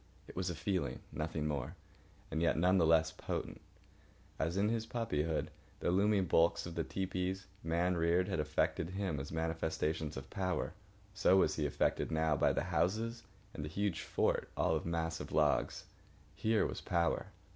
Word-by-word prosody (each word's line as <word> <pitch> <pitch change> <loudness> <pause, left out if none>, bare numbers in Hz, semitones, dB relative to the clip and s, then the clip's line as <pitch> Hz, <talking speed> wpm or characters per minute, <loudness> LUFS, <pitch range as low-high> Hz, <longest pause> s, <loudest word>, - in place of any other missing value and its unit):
It - - -11
was 90 0 -1
a 85 - -3
feeling, 80 -6 -1
nothing 75 0 -2
more, 75 -4 -2 0.6
and 80 - -1
yet 85 - +3
none 90 +3 +4
the 80 - +4
less 80 -1 +4
potent. - - -4 0.8
As, 80 +4 0
in 100 +2 +3
his 115 0 -1
puppyhood, 80 -10 -1 0.3
the - - +1
looming 100 +1 +3
bulks 85 0 +3
of 85 - -6
the 85 - -1
tepees, 95 +1 -2 0.2
man 85 +3 +1
reared, 85 +2 +2
had 95 -5 -1
affected 75 +2 0
him 95 -6 -2
as 70 - -6
manifestations 80 -1 -1
of 65 0 -8
power, 90 -4 -1 0.4
so 95 -1 +4
was - - +3
he 75 -2 +1
affected 70 - 0
now 80 -1 +2
by - - +3
the - - 0
houses 95 +8 0 0.3
and 75 - -5
the 75 - -4
huge 100 +1 -1
fort - - 0
all 80 - +2
of 80 - -2
massive 80 -1 -2
logs. - - +2 0.5
Here 110 -1 +2
was - - -4
power. 85 -1 +1
85 Hz, 170 wpm, -35 LUFS, 80-95 Hz, 0.8 s, none